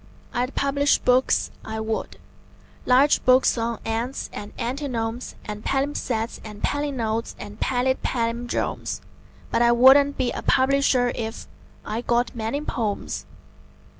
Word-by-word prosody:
I'd 250 +2 -1
publish 280 +1 +2
books, 255 +1 +2
I 220 0 -5
would 220 0 -3 0.7
large 265 +4 +5
books 255 +1 +5
on 230 -1 -2
ants 230 +4 -3
and 205 0 -7
antinomes 245 -2 -3
And 210 0 -6
palimpsests 270 -5 -1
and 210 -1 -10
palinodes 240 -6 -1
and 205 +1 -9
pallid 260 0 +1
pallindromes: 235 0 -2 0.5
But - - +2
I 235 0 +5
wouldn't 270 +4 +6
be 255 -2 0
a - - -4
publisher 260 -2 +3
if.... 225 -1 -5 0.4
I 220 +2 -3
got 240 +1 0
many 230 +5 -2
"pomes." 220 -8 -3
245 Hz, 125 wpm, -24 LUFS, 225-265 Hz, 0.7 s, wouldn't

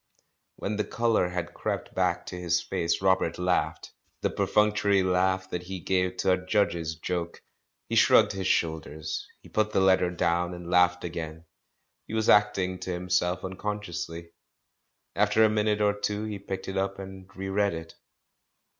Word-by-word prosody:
When 105 +1 -3
the 105 - +1
colour 115 -6 +1
had 85 -1 -4
crept - - -3
back 90 -1 0
to - - -7
his 90 -1 +1
face, 85 +3 -1
Robert 95 -3 +2
laughed 90 0 -1
— - - -44
the - - +1
perfunctory 105 -2 +2
laugh 95 0 +1
that 90 - -2
he 95 +1 -6
gave 90 0 0
to 95 0 +2
a 90 0 +1
Judge's 85 -5 0
joke. 85 +1 -4 0.4
He - - -6
shrugged - - +6
his 95 -1 -3
shoul 80 -3 +2
ders. 80 0 -6 0.2
He - - -14
put 110 0 0
the - - +3
letter 95 -1 +4
down, 90 0 0
and 90 0 -8
laughed 90 0 +4
again 80 -1 -6 0.3
— - - -51
he 110 - -5
was 110 0 +1
acting 100 -3 +3
to 95 - -4
himself 90 0 0
unconsciously. 90 -4 -5 0.8
After 105 +2 +4
a 110 - +6
minute 105 0 +1
or 105 0 +3
two 105 +1 -2
he 105 -2 -4
picked 95 -1 -6
it 95 - -3
up 95 0 -1
and 95 -1 -9
re 95 0 -5
read 100 -1 +1
it. 80 0 -8
95 Hz, 175 wpm, -27 LUFS, 90-100 Hz, 0.8 s, shrugged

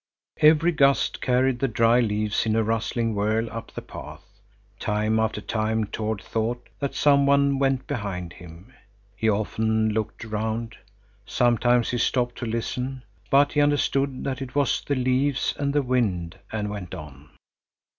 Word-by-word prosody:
Every 155 +2 +5
gust 140 -3 +2
carried 130 0 +2
the 135 - +1
dry 115 +1 +3
leaves 105 -1 0
in 110 - +1
a 115 - +2
rustling 115 +1 -1
whirl 110 +3 0
up 115 +1 -7
the - - -7
path. - - -10 0.6
Time 105 +1 0
after 110 -1 -1
time 110 +1 -1
Tord 110 0 -3
thought 120 +2 -3
that 140 -1 -3
some 140 -1 +4
one 140 -1 +3
went 135 -1 +1
behind 95 - -4
him. 85 +2 -13 0.4
He 110 +3 +1
often 110 +1 +1
looked 110 +1 -3
round. 110 +1 -3 0.5
Sometimes 120 0 +2
he 120 - -1
stopped 120 0 0
to 120 - -3
listen, 125 +3 -3 0.3
but 140 +1 +4
he 145 - +2
understood 140 -2 +1
that 135 0 -3
it 135 -1 -7
was 145 -2 +2
the 140 - -1
leaves 130 +2 +1
and 140 -1 0
the 145 0 +1
wind, 105 -10 -1
and 105 -1 -2
went 100 -4 -6
on. 75 -1 -11
115 Hz, 155 wpm, -25 LUFS, 110-135 Hz, 0.6 s, Every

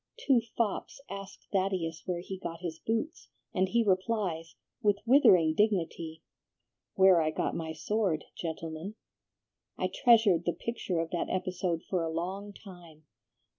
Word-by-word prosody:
Two 270 - +3 0.2
fops 225 +2 -1
ask 195 0 -8
Thaddeus 185 -4 -1
where 175 -2 -1
he 190 +1 -7
got 165 -2 -6
his 165 -3 -5
boots, 230 +9 -3 0.2
and 185 0 +1
he 235 +3 +3
replies, 185 -4 0 0.3
with 205 -3 +3
withering 185 - +6
dignity, 165 -5 0 0.7
'Where 190 -3 +6
I 155 - +1
got 155 - -1
my 160 -1 -3
sword, 180 -1 -1
gentlemen.' 165 +3 -5 0.8
I - - -1
treasured 220 -9 +5
the 175 - +1
picture 185 -2 -3
of 165 0 -2
that 175 - -2
episode 180 -2 -1
for 185 -3 0
a 165 - -1
long 185 +5 -4
time. 175 -6 -14
185 Hz, 140 wpm, -30 LUFS, 165-205 Hz, 0.8 s, withering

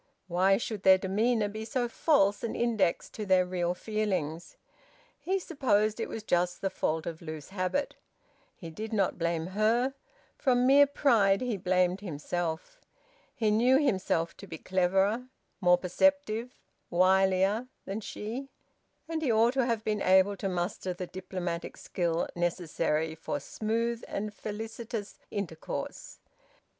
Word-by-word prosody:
Why 190 +2 +3
should 215 -2 -4
their 190 -1 +7
demeanour 210 +4 +1
be 215 +2 -6
so 245 +1 -1
false 220 -6 +2
an 230 - -2
index 225 -7 +1
to 215 - -5
their 185 -2 +4
real 180 -1 -1
feelings? 185 -7 -3 0.6
He 380 +2 0
supposed 220 - +1
it 225 - -2
was 220 - -6
just 175 -2 +1
the 195 - -1
fault 160 -3 -1
of 165 -1 -5
loose 155 -3 -7
habit. 195 +9 -1 0.6
He 165 -2 -9
did 220 +6 -6
not 195 -4 +1
blame 165 -1 0
her. 235 +5 +2 0.5
From 250 -2 +3
mere 280 +2 +7
pride 225 -9 +3
he 250 -3 -1
blamed 180 0 +1
himself. 175 - -4 0.5
He 220 -5 +1
knew 245 +5 +5
himself 190 - 0
to - - -11
be 160 - -7
cleverer, 190 +7 +1 0.3
more 180 -1 +5
perceptive, 240 +5 +1 0.3
wilier, 190 +5 +3 0.2
than 200 +3 -4
she; 235 +7 -6 0.6
and 325 -1 -3
he 280 -6 +1
ought 230 +2 +4
to 260 -2 +1
have 230 -2 -1
been 210 -2 -1
able 190 +2 +4
to 195 - -2
muster 180 +1 -2
the 180 - -4
diplomatic 180 -2 -5
skill 170 -2 -1
necessary 165 -2 -1
for 160 - -4
smooth 230 +2 -2
and 210 +1 -4
felicitous 220 0 -6
intercourse. 170 -6 -5
200 Hz, 140 wpm, -29 LUFS, 180-230 Hz, 0.6 s, their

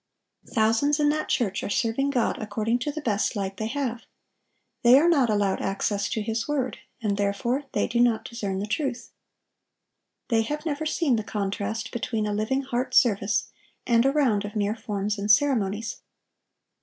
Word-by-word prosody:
Thousands 230 +7 +2
in 295 -1 +4
that 305 +1 -1
church 200 -6 0
are - - -4
serving 230 +6 0
God 250 -5 0
according 220 +2 -1
to 295 +4 -2
the 310 +1 -6
best 220 -3 0
light 195 -1 -3
they 220 - -2
have. 245 -2 -2 0.8
They 245 +2 +7
are 315 +5 +4
not 280 -8 +4
allowed 205 -2 +1
access 200 +1 -1
to 220 - -2
His 225 +1 -2
word, 275 -4 -1 0.2
and 200 -2 0
therefore 220 +7 -1
they - - +1
do 235 - -1
not 240 -2 +3
discern 205 -5 -4
the 200 - -2
truth. 245 +2 -3 1.2
They 225 -2 +3
have 295 +7 -4
never 310 0 -2
seen 300 -6 +1
the 220 - -2
contrast 210 +2 -3
between 225 -2 -2
a 210 - -1
living 220 +6 0
heart 255 -1 -2
service 200 -3 +3 0.3
and 235 -1 +4
a 270 - +3
round 255 -9 +2
of 205 +1 -7
mere 210 0 0
forms 205 -1 -3
and 205 +1 -3
ceremonies. 220 -3 +2
225 Hz, 175 wpm, -26 LUFS, 205-265 Hz, 1.2 s, They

